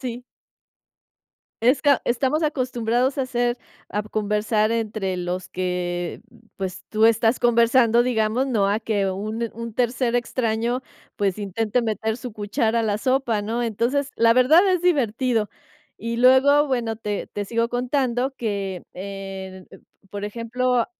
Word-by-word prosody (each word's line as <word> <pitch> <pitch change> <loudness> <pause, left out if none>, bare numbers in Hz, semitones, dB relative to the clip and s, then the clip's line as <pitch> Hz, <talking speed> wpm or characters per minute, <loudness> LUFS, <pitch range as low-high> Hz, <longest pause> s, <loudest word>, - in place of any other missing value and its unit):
Sí. 245 -1 -5 1.4
Esa 275 +3 +3
estamos 265 +6 +1
acostumbrados 255 -3 0
a 275 - +1
hacer 245 -1 0 0.3
a 210 - -2
conversar 215 +1 0
entre 215 -4 -2
los 180 +1 -4
que 180 -1 -3 0.4
pues, 190 -2 -5
tú 220 +1 +4
estás 230 +1 +3
conversando, 235 0 +4
digamos, 240 +1 +1
no 215 -7 +1
a 205 +2 +1
que 210 -3 -1
un 215 +4 -3
un 230 0 -6
tercer 240 +1 0
extraño, 240 0 -1 0.3
pues, 200 -1 0
intente 210 +4 -1
meter 220 0 -2
su 245 -1 -7
cuchara 220 +2 0
a - - -1
la 210 -2 0
sopa, 255 -3 +1
¿no? 225 +4 -2
Entonces, 240 +5 0
la 230 0 +5
verdad 315 +10 +5
es 365 -2 +1
divertido. 250 -8 +1 0.5
Y 230 +1 -4
luego, 265 +4 +5
bueno, 240 -5 -1
te 210 -2 -4
te 205 -1 -5
sigo 230 +2 0
contando 250 +1 0
que, 200 -5 -3
eh, 190 -1 -7 0.5
por 205 0 -4
ejemplo 240 +2 0
230 Hz, 135 wpm, -23 LUFS, 210-250 Hz, 1.4 s, la